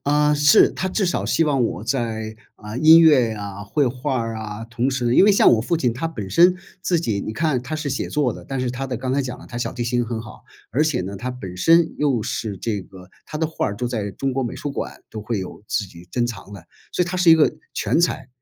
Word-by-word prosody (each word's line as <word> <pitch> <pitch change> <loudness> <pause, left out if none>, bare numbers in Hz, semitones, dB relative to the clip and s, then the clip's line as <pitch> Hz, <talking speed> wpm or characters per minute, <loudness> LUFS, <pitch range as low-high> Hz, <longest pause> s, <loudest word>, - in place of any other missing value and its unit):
啊， 150 +1 +3
是， 150 0 +6
他 190 - -3
至 195 +2 0
少 175 - -1
希 165 - +2
望 140 -5 +1
我 100 -4 -2
在， 115 -4 -2 0.2
啊， 105 +1 -8
音 160 +4 +8
乐 145 -8 +5
呀、 100 -2 -6
绘 140 +7 0
画 125 +1 -2
儿 115 -1 -3
啊， 110 0 -6
同 120 +3 -1
时 130 -2 -2
呢 120 - +2
因 - - +7
为 210 - +6
像 195 - +6
我 115 - +3
父 170 +9 0
亲 125 -7 0
他 135 +8 -3
本 110 -12 -6
身 175 - +5 0.3
自 175 -2 +1
己， 110 -11 -1
你 110 - -5
看 150 0 0
他 140 +5 -5
是 155 -1 -3
写 140 - -2
作 145 -5 0
的， - - -11
但 135 -1 -4
是 125 -1 -1
他 130 +2 -4
的 130 -2 -3
刚 130 +2 -3
才 140 - +1
讲 125 -1 -6
了 - - -13
他 120 - -8
小 120 - -3
提 120 - -3
琴 120 +1 0
很 115 -1 -4
好， 110 -1 -12 0.3
而 130 +8 +2
且 155 -4 0
呢， 95 +2 -5
他 125 +6 -4
本 95 -8 -8
身 165 - +4
又 135 -6 +1
是 105 -1 -3
这 105 +1 -3
个， 90 -1 -14 0.2
他 150 - -6
的 160 - +1
画 160 - -2
儿 100 - -4
都 125 +3 -2
在 110 -4 -3
中 135 -1 -2
国 135 +1 -1
美 120 - -4
术 145 - -4
馆 - - -6
都 110 - -6
会 110 +1 -3
有 95 +1 -7
自 105 - 0
己 85 -1 -14
珍 120 -1 0
藏 105 -4 -8
的， 95 -5 -10 0.3
所 - - +1
以 175 - -1
他 185 - -3
是 180 -2 +5
一 - - +10
个 160 -2 +3 0.2
全 - - +1
才。 170 -6 0
125 Hz, 290 characters per minute, -22 LUFS, 110-150 Hz, 0.3 s, 一